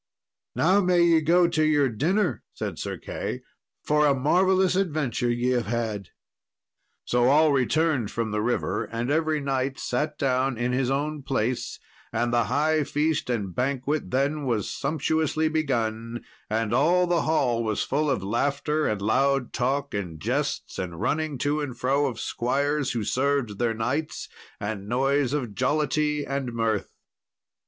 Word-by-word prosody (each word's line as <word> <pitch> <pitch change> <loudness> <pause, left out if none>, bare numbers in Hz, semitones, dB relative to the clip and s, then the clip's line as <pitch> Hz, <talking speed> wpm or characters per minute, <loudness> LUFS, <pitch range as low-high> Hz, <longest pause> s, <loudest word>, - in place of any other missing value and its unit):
"Now 190 +5 +4
may 180 -1 +4
ye 165 -2 +4
go 170 +3 +4
to 160 -2 +1
your 150 -2 +3
dinner," 155 - 0
said - - -4
Sir - - -4
Key, - - -5 0.4
"for 150 0 +3
a 140 - +3
marvellous 185 +7 +3
adventure 150 -10 0
ye 120 +1 0
have 120 -4 0
had." 110 -4 -2 1.0
So 120 0 +2
all 150 +4 +5
returned 140 -2 +1
from 115 -2 -2
the 105 0 0
river, 120 +3 -1
and 120 +3 -3
every 155 0 +1
knight 135 -1 -1
sat 150 +4 -2
down 130 -1 +1
in 120 +2 0
his 125 0 0
own 145 +2 -1
place, 130 -3 -2 0.3
and 120 +1 0
the 120 -1 +3
high 150 +6 +1
feast 150 0 -1
and 105 -7 -2
banquet 135 - -1
then 140 +3 0
was 115 -5 -1
sumptuously 155 +2 0
begun, 120 -6 -2 0.2
and 110 +1 0
all 170 +8 +4
the 175 -2 +1
hall 125 -7 +1
was 110 -2 -1
full 150 +2 0
of 125 -8 0
laughter 140 +8 0
and 105 -2 -2
loud 135 +4 +1
talk 135 +3 -1
and 90 -6 -4
jests, - - -2
and 85 -3 -5
running 155 - -1
to 145 +4 0
and 130 -5 -5
fro 140 +4 +1
of 120 -4 -5
squires 140 +3 0
who 115 -3 -2
served 130 -3 0
their 120 -2 +1
knights, 130 +8 -2 0.3
and 105 -1 -4
noise 135 +2 +1
of 130 -7 -2
jollity 150 +3 0
and 135 -3 -3
mirth. 115 -3 -1
135 Hz, 155 wpm, -25 LUFS, 120-150 Hz, 1.0 s, all